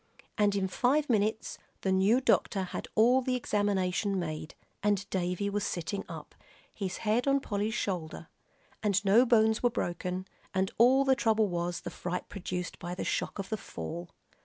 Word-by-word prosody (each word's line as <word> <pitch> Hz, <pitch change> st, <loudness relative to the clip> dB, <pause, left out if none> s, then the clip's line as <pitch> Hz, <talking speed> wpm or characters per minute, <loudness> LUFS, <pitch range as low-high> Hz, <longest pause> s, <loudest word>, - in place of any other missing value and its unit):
And 205 Hz, -1 st, +2 dB
in 195 Hz, -1 st, +1 dB
five 265 Hz, +8 st, +1 dB
minutes 215 Hz, 0 st, 0 dB, 0.2 s
the 190 Hz, -, 0 dB
new 195 Hz, +7 st, +4 dB
doctor 200 Hz, -6 st, +2 dB
had 180 Hz, -, -5 dB
all 245 Hz, +4 st, +5 dB
the 255 Hz, 0 st, 0 dB
examination 200 Hz, -3 st, 0 dB
made, 155 Hz, -3 st, -4 dB, 0.3 s
and 200 Hz, -1 st, +1 dB
Davie 180 Hz, +1 st, -1 dB
was 205 Hz, 0 st, -1 dB
sitting 180 Hz, +3 st, -3 dB
up, -, -, -8 dB, 0.4 s
his 190 Hz, -3 st, -4 dB
head 225 Hz, +5 st, +2 dB
on 275 Hz, 0 st, +4 dB
Polly's 215 Hz, -2 st, -2 dB
shoulder; 175 Hz, -8 st, -3 dB, 0.5 s
and 205 Hz, -1 st, +1 dB
no 225 Hz, +6 st, +6 dB
bones 220 Hz, -2 st, +4 dB
were 245 Hz, -, +4 dB
broken, 180 Hz, -2 st, -3 dB, 0.3 s
and 190 Hz, 0 st, +1 dB
all 260 Hz, +4 st, +6 dB
the 265 Hz, -, +5 dB
trouble 220 Hz, -4 st, +2 dB
was 175 Hz, -1 st, -2 dB
the -, -, -6 dB
fright 180 Hz, 0 st, -4 dB
produced 180 Hz, -2 st, -5 dB
by 175 Hz, +1 st, -5 dB
the -, -, -3 dB
shock -, -, -2 dB
of 195 Hz, -1 st, -5 dB
the 220 Hz, -, -1 dB
fall. 170 Hz, -, -7 dB
200 Hz, 170 wpm, -30 LUFS, 180-225 Hz, 0.5 s, no